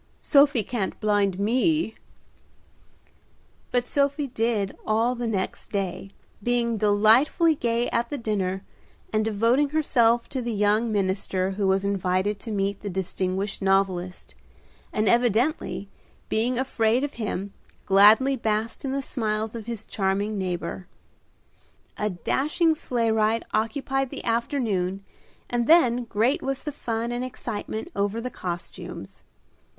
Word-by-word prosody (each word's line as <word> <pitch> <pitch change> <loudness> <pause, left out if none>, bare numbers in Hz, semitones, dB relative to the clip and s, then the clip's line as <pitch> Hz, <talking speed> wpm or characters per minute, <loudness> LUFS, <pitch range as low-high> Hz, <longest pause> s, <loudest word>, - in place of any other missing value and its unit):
Sophie 280 -5 +4
can't 210 -3 -3
blind 205 -3 +1
me." 250 - +1 1.8
But 245 -1 +1
Sophie 280 +2 +1
did 225 -4 -1
all 225 +3 +1
the 240 -1 -3
next 195 -4 -3
day, 195 -1 -3 0.3
being 235 0 0
delightfully 220 - +4
gay 235 -4 0
at 235 0 0
the 290 - -3
dinner, 195 -5 -2 0.5
and 215 0 +2
devoting 230 +7 +2
herself 240 -6 +2
to 260 - -3
the 240 -1 -3
young 210 +2 +2
minister 190 -1 0
who 195 0 -1
was 190 +1 +2
invited 195 +1 0
to 225 - -8
meet 200 -1 -1
the 205 - -4
distinguished 190 +2 -3
novelist, 190 -2 0 0.6
and 215 -1 0
evidently 240 - +1 0.4
being 235 +3 +1
afraid 245 -1 +1
of 290 0 -3
him, 200 -1 -3 0.3
gladly 215 +8 +6
basked 220 -1 -2
in 270 -1 -2
the 275 0 -1
smiles 215 -3 -2
of 230 -2 -7
his 230 -2 -5
charming 200 +1 -1
neighbor. 180 -1 -4 1.1
A 210 - -1
dashing 300 - +1
sleigh 240 -7 -1
ride 220 +1 +1
occupied 270 +4 0
the - - -7
afternoon, 220 -6 -1 0.4
and 240 -1 -1
then 250 -8 +5
great 235 - +1
was 270 0 -3
the 300 - -3
fun 235 -4 -3
and 240 +1 -2
excitement 220 -3 -5
over 200 +3 0
the 250 +2 -4
costumes. 175 -4 -7
220 Hz, 130 wpm, -25 LUFS, 200-245 Hz, 1.8 s, gladly